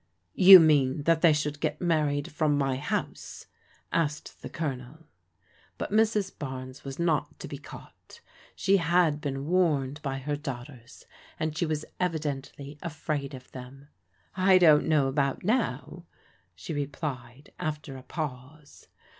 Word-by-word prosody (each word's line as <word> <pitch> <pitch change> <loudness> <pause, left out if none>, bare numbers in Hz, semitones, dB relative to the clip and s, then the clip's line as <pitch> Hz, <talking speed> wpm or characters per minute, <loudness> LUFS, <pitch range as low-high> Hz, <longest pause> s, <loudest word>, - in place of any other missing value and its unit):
"You 190 0 +10
mean 145 -3 +3
that 165 +1 +2
they 170 - +6
should 150 -1 -1
get 150 -1 -2
married 150 -4 0
frona 150 -1 +1
my 135 -2 0
house? 145 - -4 0.2
" - - -25
asked 150 -2 -2
the - - -7
Colonel. 145 +1 -6 0.7
But - - -5
Mrs. 215 -2 +1
Barnes 130 -2 -7
was 135 -1 -7
not 165 -4 0
to - - -8
be - - -7
caught. - - -14 0.4
She 200 +1 +3
had 165 -3 +2
been 135 -1 -4
warned 150 -5 +1
by 135 -2 -3
her 145 +2 -3
daughters, 130 -3 -9 0.3
and 155 -1 -2
she 170 +1 -1
was 155 -1 -2
evidently 150 -4 -4
afraid 150 -4 -4
of 130 0 -14
them. 135 +2 -11 0.5
I 185 0 +5
don't 160 -5 +5
know 150 -4 +3
about 140 0 -1
now," 175 - -1 0.5
she 95 - -7
replied 140 -2 -5
after 150 -2 -4
a 130 - -9
pause. 145 0 -8
150 Hz, 145 wpm, -27 LUFS, 135-165 Hz, 0.7 s, You